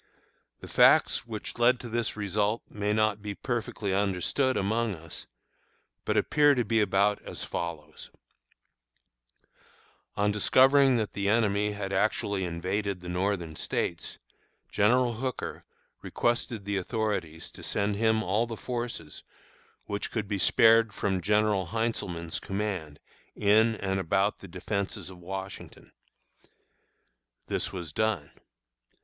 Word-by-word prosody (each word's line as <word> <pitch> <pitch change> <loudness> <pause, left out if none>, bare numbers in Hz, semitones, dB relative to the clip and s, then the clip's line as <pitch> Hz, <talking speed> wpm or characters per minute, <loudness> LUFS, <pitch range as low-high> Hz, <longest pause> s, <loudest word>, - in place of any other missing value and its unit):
The - - -9
facts 120 - +4
which 110 +1 -7
led 120 +1 +4
to 120 - -7
this 115 -1 -2
result 105 +2 0
may 105 0 -2
not 110 -1 +1
be 105 -1 -5
perfectly 110 -5 -3
understood 100 +7 +1
among 110 +1 0
us, 80 -1 -10 0.8
but - - 0
appear 145 -1 +4
to 120 -2 0
be 115 +1 +2
about 100 +1 +2
as - - -8
follows: 80 -3 -6 2.1
On 105 0 +2
discovering 135 +5 +5
that 110 -2 -2
the 100 0 -1
enemy 105 -1 +2
had 100 -1 -4
actually 100 -1 0
invaded 95 +3 -2
the 90 - -7
Northern 90 -3 -1
States, - - -3 0.5
General 120 +3 +3
Hooker 130 +2 -5 0.4
requested 120 -3 -1
the 100 -1 -1
authorities 95 -6 -3
to - - -13
send 100 0 -1
him 110 +1 +2
all 105 +6 +1
the 115 -1 -6
forces 120 -11 -5 0.6
which 100 0 -3
could 110 -3 -3
be 100 -1 -2
spared 115 +2 +5
from 95 -2 -1
General 105 -1 +2
Heintzelman's 90 -6 -2
command 95 -7 -4 0.4
in 110 +2 +4
and 95 -2 -2
about 95 +3 +1
the 95 - -10
Defenses 95 +1 -4
of 90 - -13
Washington. 95 +2 -8 1.5
This - - -2
was 85 -5 -6
done. 110 -9 -1
105 Hz, 125 wpm, -28 LUFS, 95-115 Hz, 2.1 s, discovering